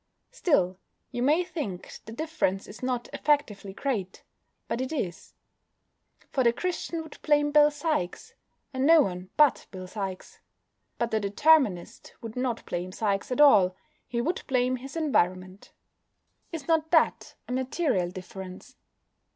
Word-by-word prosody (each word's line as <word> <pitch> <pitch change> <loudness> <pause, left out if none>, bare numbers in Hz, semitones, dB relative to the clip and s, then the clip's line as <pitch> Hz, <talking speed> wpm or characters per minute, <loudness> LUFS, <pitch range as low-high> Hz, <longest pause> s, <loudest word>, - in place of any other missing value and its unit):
Still, 190 - +1 0.3
you 245 - -3
may 300 +7 +3
think 290 - -6
the 220 - -9
difference 235 - -1
is 205 - -12
not 250 -2 -2
effectively 250 -10 0
great. 200 -4 -3 0.4
But 245 - -2
it 260 - -3
is. 195 - -4 1.0
For 260 - +1
the 235 - +5
Christian 335 +3 -3
would 315 - -13
blame 295 -1 +3
Bill 295 0 +6
Sikes, 295 - -3 0.4
and 260 +1 +1
no 325 -2 +7
one 180 -2 -5
but 295 -3 +4
Bill 185 -2 -8
Sikes. 190 -1 -6 0.6
But 235 -1 -1
the 220 - +2
Determinist 205 - +2
would 225 -1 -8
not 250 -2 -2
blame 180 +1 -4
Sikes 200 +2 -1
at 250 - -1
all: 190 -11 +6 0.3
he 235 -1 -1
would 335 +9 -1
blame 255 -1 +1
his 270 +4 -10
environment. 185 - 0 0.8
Is 325 -5 -6
not 320 -1 +2
that 320 -2 +2
a - - -7
material 255 - 0
difference? 185 0 -9
250 Hz, 145 wpm, -27 LUFS, 190-295 Hz, 1.0 s, no